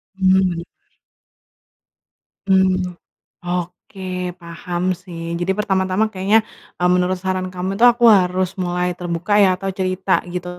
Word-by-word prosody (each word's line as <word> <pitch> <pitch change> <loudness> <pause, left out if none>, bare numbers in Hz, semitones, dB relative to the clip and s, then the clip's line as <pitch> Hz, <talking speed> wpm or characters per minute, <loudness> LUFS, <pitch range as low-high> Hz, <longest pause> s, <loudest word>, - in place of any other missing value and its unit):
Mhm, 190 -1 +3
bener. 180 -3 +1 1.8
Mhm, 190 -1 +2 0.6
oke, 180 +2 -5 0.4
paham 175 +1 -5 0.2
sih. 175 -3 -9 0.2
Jadi 175 +2 0
pertama-tama 195 +1 0
kayaknya, 200 +3 +2 0.3
mmm, 180 0 +1
menurut 180 +1 +2
saran 185 0 -2
kamu 185 +1 -4
itu, 240 - +6
aku 240 0 +3
harus 185 -2 +2
mulai 180 0 -1
terbuka 175 +4 0
ya, 190 -2 +5
atau 195 +1 -4
cerita, 185 0 0
gitu, 180 0 -5
185 Hz, 125 wpm, -20 LUFS, 180-190 Hz, 1.8 s, itu